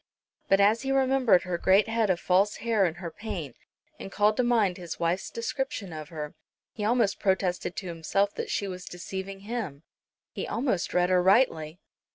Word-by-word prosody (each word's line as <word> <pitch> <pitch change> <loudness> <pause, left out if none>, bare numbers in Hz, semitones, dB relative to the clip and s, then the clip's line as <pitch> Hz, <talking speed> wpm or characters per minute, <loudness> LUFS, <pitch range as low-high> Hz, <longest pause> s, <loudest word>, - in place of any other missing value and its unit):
But 195 - +5
as 210 +3 +4
he 270 0 -2
remembered 265 -7 +3
her 180 -2 -3
great 195 +4 +4
head 225 -2 +1
of 180 -2 +2
false 195 +4 +2
hair 225 -3 +1
and 170 -1 -2
her 175 -2 -6
paint, 165 - -6 0.4
and 195 - -8
called 210 +1 +3
to 250 - +3
mind 225 -7 +2
his 175 -3 -7
wife's 170 +2 -1
description 230 - -4
of 155 -1 -7
her, 150 -2 -6 0.4
he 210 - -5
almost 220 -2 +2
protested 185 -2 0
to 185 - -5
himself 175 +4 0
that - - -5
she 200 - -1
was 180 -1 -7
deceiving 190 +2 -6
him; 200 -10 -5 0.5
he - - -5
almost 230 -8 -1
read 180 0 +3
her 180 -1 +4
rightly. 180 -6 +3
195 Hz, 185 wpm, -27 LUFS, 175-225 Hz, 0.5 s, But